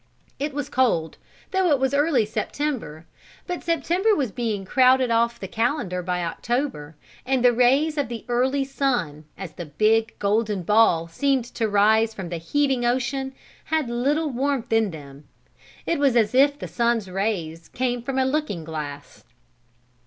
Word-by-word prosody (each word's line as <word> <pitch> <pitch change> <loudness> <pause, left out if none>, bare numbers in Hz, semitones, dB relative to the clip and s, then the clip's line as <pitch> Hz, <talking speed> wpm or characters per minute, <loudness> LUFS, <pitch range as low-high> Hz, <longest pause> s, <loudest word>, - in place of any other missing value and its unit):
It 290 +2 -2
was 290 -1 -3
cold, 225 - 0 0.3
though 380 -2 +2
it 290 - +4
was 265 0 0
early 285 -5 +3
September, 220 - -4 0.4
but 360 -1 -4
September 345 +6 +1
was 265 - -1
being 220 -5 -3
crowded 255 +2 +4
off 235 +1 +1
the 190 - -6
calendar 220 - -1
by 180 0 -2
October, 170 - -3 0.3
and 255 -1 +1
the 245 - +6
rays 275 +6 +3
of 285 - 0
the 235 -2 -6
early 260 +3 +1
sun, 245 - -2
as 190 -4 -7
the 175 - -8
big, 220 +8 +1
golden 210 -1 0
ball 175 -5 +3
seemed 265 +8 0
to 225 -2 -1
rise 220 +2 +3
from 190 -4 -6
the 170 - -3
heaving 265 - 0
ocean, 260 +2 -1 0.3
had 310 -6 -1
little 290 +6 0
warmth 265 -2 -1
in 225 -2 +3
them. 145 -3 -11 0.6
It 335 - 0
was 275 -4 +3
as 225 -2 +3
if 285 +2 +4
the - - -6
sun's 235 -3 0
rays 180 -4 -3
came 245 -1 -2
from 265 +2 -4
a 260 - +3
looking 265 - -2
glass. 150 -3 -7
240 Hz, 160 wpm, -23 LUFS, 195-275 Hz, 0.6 s, the